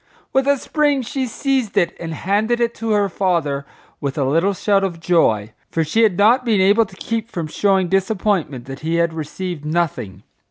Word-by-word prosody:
With 265 Hz, +1 st, +2 dB
a 280 Hz, 0 st, +4 dB
spring 290 Hz, -1 st, 0 dB
she 265 Hz, +1 st, -3 dB
seized 260 Hz, -2 st, -1 dB
it 175 Hz, -, +2 dB
and 165 Hz, -1 st, -5 dB
handed 210 Hz, +8 st, 0 dB
it 235 Hz, -1 st, +1 dB
to 225 Hz, 0 st, -5 dB
her 205 Hz, -2 st, +2 dB
father 165 Hz, -7 st, -1 dB, 0.3 s
with 140 Hz, 0 st, -3 dB
a 140 Hz, -, +1 dB
little 165 Hz, +9 st, +1 dB
shout 200 Hz, 0 st, +2 dB
of 175 Hz, -4 st, -3 dB
joy, 115 Hz, -11 st, +1 dB, 0.2 s
for 165 Hz, -, 0 dB
she 190 Hz, +9 st, +1 dB
had 210 Hz, -6 st, +3 dB
not 235 Hz, +5 st, +4 dB
been 225 Hz, -5 st, +2 dB
able 205 Hz, +4 st, +4 dB
to 190 Hz, -, -15 dB
keep 225 Hz, +3 st, -3 dB
from 170 Hz, -7 st, -4 dB
showing 190 Hz, +3 st, +1 dB
disappointment 190 Hz, -, 0 dB
that 135 Hz, +1 st, -8 dB
he 160 Hz, +2 st, -2 dB
had 170 Hz, -1 st, +1 dB
received 160 Hz, +1 st, -5 dB
nothing. 150 Hz, -, -2 dB
190 Hz, 195 wpm, -20 LUFS, 160-225 Hz, 0.3 s, a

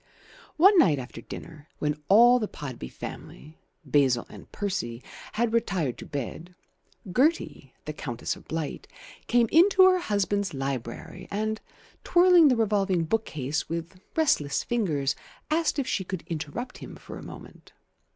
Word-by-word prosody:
One 385 Hz, +4 st, +7 dB
night 160 Hz, -, +5 dB
after 130 Hz, -1 st, -7 dB
dinner, 155 Hz, -2 st, -10 dB
when 150 Hz, 0 st, -2 dB
all 240 Hz, +5 st, +7 dB
the 215 Hz, -, -2 dB
Podby 130 Hz, -, -7 dB
family 155 Hz, +2 st, -9 dB, 0.3 s
(Basil 135 Hz, -3 st, +2 dB
and -, -, -13 dB
Percy) 185 Hz, -, -3 dB, 0.3 s
had 230 Hz, 0 st, 0 dB
retired 185 Hz, -, 0 dB
to -, -, -9 dB
bed, 160 Hz, +6 st, -6 dB, 0.6 s
Gertie 245 Hz, -, +1 dB, 0.2 s
(Countess 120 Hz, -3 st, -3 dB
of -, -, -16 dB
Blight) 160 Hz, -2 st, -4 dB, 0.4 s
came 240 Hz, -1 st, +3 dB
into 375 Hz, +4 st, +6 dB
her 370 Hz, -1 st, +4 dB
husband's 200 Hz, -, -1 dB
library 135 Hz, +6 st, -5 dB
and, 215 Hz, +2 st, -2 dB, 0.4 s
twirling 350 Hz, -2 st, +6 dB
the 260 Hz, -, +4 dB
revolving 200 Hz, -5 st, +1 dB
bookcase 155 Hz, -7 st, -2 dB
with 170 Hz, +2 st, -5 dB, 0.2 s
restless 215 Hz, -, +2 dB
fingers, 155 Hz, -, 0 dB, 0.4 s
asked 325 Hz, -1 st, +1 dB
if 280 Hz, -, 0 dB
she 190 Hz, -, -1 dB
could 185 Hz, -1 st, -5 dB
interrupt 165 Hz, -, -5 dB
him -, -, -9 dB
for -, -, -10 dB
a -, -, -10 dB
moment. -, -, -12 dB
185 Hz, 140 wpm, -27 LUFS, 145-240 Hz, 0.6 s, One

